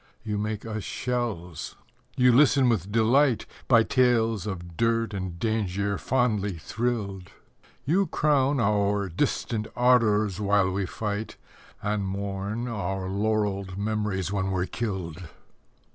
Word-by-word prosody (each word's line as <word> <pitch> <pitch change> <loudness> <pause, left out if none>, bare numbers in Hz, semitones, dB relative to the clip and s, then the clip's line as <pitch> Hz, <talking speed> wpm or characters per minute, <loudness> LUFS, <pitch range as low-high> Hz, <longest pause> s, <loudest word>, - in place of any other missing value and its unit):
You 105 -1 -2
make 105 0 -3
us 110 -2 -4
shells. 115 - -3 0.4
You 125 0 +6
listen 135 -1 +5
with 100 -4 0
delight, 120 +3 +3 0.2
By 115 -3 +6
tales 115 -5 +2
of 85 -4 -6
dirt 115 0 +1
and 95 -3 -4
danger 100 -1 -1
fondly 105 -7 0
thrilled. 100 -2 -3 0.6
You 180 +7 +2
crown 140 -2 +2
our 100 -2 +1
distant 110 - -1
ardours 110 -5 +3
while 100 -2 +2
we 95 0 -1
fight, 105 +2 -4 0.5
And 105 -1 0
mourn 100 +4 -3
our 95 -4 -3
laurelled 100 -2 -1
memories 100 -3 -1
when 95 -1 0
we're 90 -1 0
killed. 95 -7 -4
105 Hz, 120 wpm, -26 LUFS, 95-115 Hz, 0.6 s, You